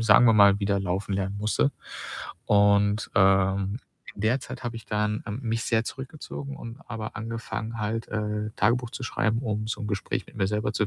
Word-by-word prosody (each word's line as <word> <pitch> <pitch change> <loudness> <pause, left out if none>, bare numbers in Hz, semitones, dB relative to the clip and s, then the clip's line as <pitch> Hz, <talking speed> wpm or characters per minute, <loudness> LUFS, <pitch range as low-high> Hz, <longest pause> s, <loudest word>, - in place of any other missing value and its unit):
sagen 115 +2 +7
wir 115 - +6
mal, 100 -1 +6
wieder 100 0 +2
laufen 95 +1 -1
lernen 100 +1 -2
musste. 110 +7 +1 0.7
Und, 100 +1 +4
ähm, 95 +1 +3 0.4
in - - -8
der 120 +5 +2
Zeit 130 - -8
habe 120 - -3
ich 115 - -8
dann, 105 0 0
ähm, 105 +3 -3
mich 115 -1 -1
sehr 115 -1 +2
zurückgezogen 140 +2 -6
und 115 -3 -8
aber 110 -2 -5
angefangen 115 0 -4
halt, 110 +1 -2
äh, 105 0 -2
Tagebuch 120 +2 +2
zu 130 +1 -7
schreiben, 110 -1 +1
um 110 -3 -2
so 110 - -3
'n 110 - -3
Gespräch 100 -1 -2
mit - - -16
mir 95 - +2
selber 105 +1 0
zu 105 - +1
105 Hz, 195 wpm, -27 LUFS, 100-115 Hz, 0.7 s, sagen